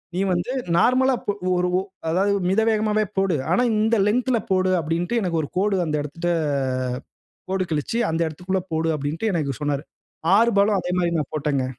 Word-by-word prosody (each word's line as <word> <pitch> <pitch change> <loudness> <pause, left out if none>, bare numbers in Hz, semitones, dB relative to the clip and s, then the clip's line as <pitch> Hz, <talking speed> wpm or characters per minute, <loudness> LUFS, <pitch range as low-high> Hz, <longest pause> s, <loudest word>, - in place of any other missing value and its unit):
நீ - - -1
வந்து 175 +7 -2 0.3
நார்மலா 260 +6 +4
இப்ப 205 - -2 0.3
ஒரு 180 0 +1
ஒ - - 0 0.3
அதாவது 190 +5 +2 0.2
மித 195 +4 +3
வேகமாவே 215 0 +1
போடு! 190 -3 +2 0.2
ஆனா 215 +8 +3
இந்த 220 +2 +2
லென்த்து 250 +4 +1
ல - - +2
போடு! 185 0 +2
அப்பிடின்டு 165 +5 -2
எனக்கு 170 -4 0
ஒரு 145 - -6
கோடு 200 +1 +2
அந்த 155 -2 -1
இடத்திட்ட 170 +4 -4 1.2
கோடு 190 0 0
கிழிச்சு, 155 +9 -1
அந்த 165 +1 -1
இடத்துக்குள்ள 180 +5 -2
போடு! 160 +1 0
அப்பிடின்ட்டு 155 +9 -2
எனக்கு 145 -7 -2
சொன்னாரு. 145 -1 -1 0.5
6 230 +2 +4
பாலும் 200 +1 +4
அதேமாரி 180 -1 0
நான் 150 - -3
போட்டங்க. 140 -3 0
180 Hz, 175 wpm, -23 LUFS, 160-210 Hz, 1.2 s, நார்மலா